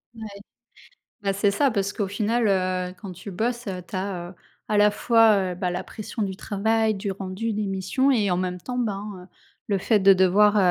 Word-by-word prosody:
Ouais. 225 - -11 1.0
Bah, 195 - +1
c'est 200 +1 +2
ça 270 +8 +2
parce 200 -2 -1
qu'au 205 - -2
final, 220 +3 0
heu, 185 -1 0
quand 190 -1 -7
tu 180 +3 -9
bosses, 235 +5 -2
heu, 185 -2 -4
tu 180 - -6
as, 185 -2 -4
heu, - - -14 0.3
à 215 - +1
la 205 0 +5
fois, 210 -3 +3
heu, - - -5
bah, 180 0 -2
la 180 - -3
pression 215 +1 -6
du 190 -2 -3
travail, 220 +2 0
du 200 0 -4
rendu, 195 +4 -4
des 210 0 -2
missions 195 +8 0
et 215 -6 +2
en 180 - +1
même 180 -1 -3
temps, 250 +5 -5
ben, 205 -4 -2 0.2
heu, - - -16 0.4
le 200 -2 0
fait 210 +3 +2
de 195 0 +7
devoir, 195 +3 +4
200 Hz, 215 wpm, -24 LUFS, 185-220 Hz, 1.0 s, de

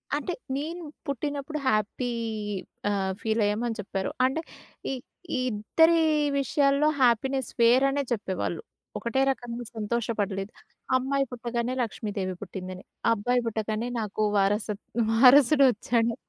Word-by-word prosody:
అంటే 300 +5 -2 0.2
నేను 330 +5 -4 0.2
పుట్టినప్పుడు 285 +2 -3
హ్యాపీ 215 +2 0 0.8
ఆహ్, 195 -2 0
ఫీల్ 220 0 0
అయ్యామని 225 +3 -1
చెప్పారు. 195 -1 -3
అంటే 270 +5 0 0.5
ఈ - - -1 0.4
ఈ - - +1
ఇద్దరి 325 +11 +3 0.4
విషయాల్లో 280 +2 +2
హ్యాపీనెస్ 260 +2 +2
వేరనే 270 +4 +4
చెప్పేవాళ్ళు. 200 - -2 0.4
ఒకటే 235 +3 0
రకంగా 240 -2 -3
సంతోషపడలేదు. 210 -3 -2 0.5
అమ్మాయి 275 +2 0
పుట్టగానే 240 0 -2
లక్ష్మీదేవి 205 -4 -3
పుట్టిందని. 185 -1 -7 0.3
అబ్బాయి 245 +3 +1
పుట్టగానే 220 +1 -2
నాకు 215 0 -2
వారస 205 +2 +2 0.4
వారసుడొచ్చాడు. 245 -2 +5
235 Hz, 105 wpm, -27 LUFS, 210-270 Hz, 0.8 s, వారసుడొచ్చాడు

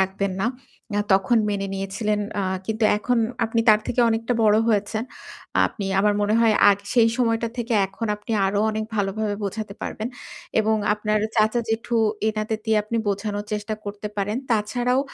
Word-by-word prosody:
রাখবেন 190 +1 0
না। 205 - +1 0.5
অ্যা 205 - +1
তখন 195 +5 +3
মেনে 200 -1 -2
নিয়েছিলেন। 205 +2 -2 0.2
আ - - -1 0.2
কিন্তু 220 0 -1
এখন 240 +3 0 0.3
আপনি 230 0 0
তার 215 0 +7
থেকে 245 - 0
অনেকটা 230 +1 0
বড় 215 -1 +5
হয়েছে। 210 0 +1 0.7
আপনি 200 -3 -6
আমার 205 +1 +3
মনে 205 +1 +2
হয় 225 -2 +4 0.2
আগ 200 - +2 0.2
সেই 230 -2 +5
সময়টা 230 -2 +1
থেকে 235 -1 -1
এখন 195 +4 -5
আপনি 210 +2 -6
আরো 200 +1 0
অনেক 215 0 -2
ভালোভাবে 205 +1 -1
বোঝাতে 200 0 -4
পারবেন। 220 +2 -4 0.5
এবং 220 0 +2 0.2
আপনার 210 0 0 0.2
চাচা, 220 +2 +3
জেঠু 230 +1 -1 0.3
এনাদের 215 0 -2
দিয়ে 220 -1 +2
আপনি 215 +3 -3
বোঝানোর 205 +1 -2
চেষ্টা 210 +1 -2
করতে 205 +1 -5
পারেন। 205 +3 -1
তাছাড়াও 245 +4 +1
215 Hz, 165 wpm, -23 LUFS, 205-225 Hz, 0.7 s, তার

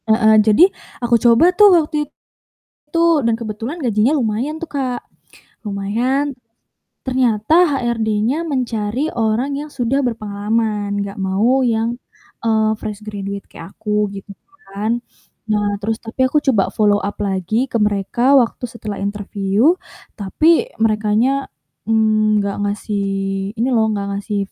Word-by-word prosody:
Heeh, 220 0 +5
jadi 215 - +6 0.4
aku 240 0 +3
coba 245 +10 +5
tuh 415 +2 +7
waktu 300 -2 -1 0.6
itu 315 +3 -6 0.3
dan 230 -1 +2
kebetulan 230 +6 -5
gajinya 235 +4 +2
lumayan 250 +3 -1
tuh, 335 - -7
Kak. 260 -4 -2 0.6
Lumayan, 240 +8 -1 0.7
ternyata 255 +5 +3
HRD-nya 235 +2 0
mencari 250 -2 -2
orang 230 +1 0
yang 295 +2 -6
sudah 260 +3 0
berpengalaman 210 -2 -2
nggak 200 0 -5
mau 215 +8 +2
yang, 230 0 0 0.5
eee, 220 -1 +2
fresh 210 -1 -6
graduate 200 -2 -6
kayak 165 +4 -11
aku 210 -1 -1
gitu 200 0 -9 0.4
kan. 220 +4 -1 0.5
Nah, 205 -1 0
terus 220 +2 -1
tapi 225 +3 -8
aku 300 +3 +2
coba 200 -5 +2
follow 205 -1 +2
up 205 - -3
lagi 200 +4 0
ke - - 0
mereka 210 +5 +1
waktu 245 -1 +1
setelah 215 -3 -7
interview, 205 - +1 0.4
tapi 320 - +2
merekanya 220 +5 +1 0.4
nggak 215 -2 +2
ngasih 205 0 -2 0.5
ini 235 +3 0
loh 220 -2 +3
nggak 200 -1 -3
ngasih, 205 0 -3
220 Hz, 125 wpm, -18 LUFS, 205-255 Hz, 0.7 s, tuh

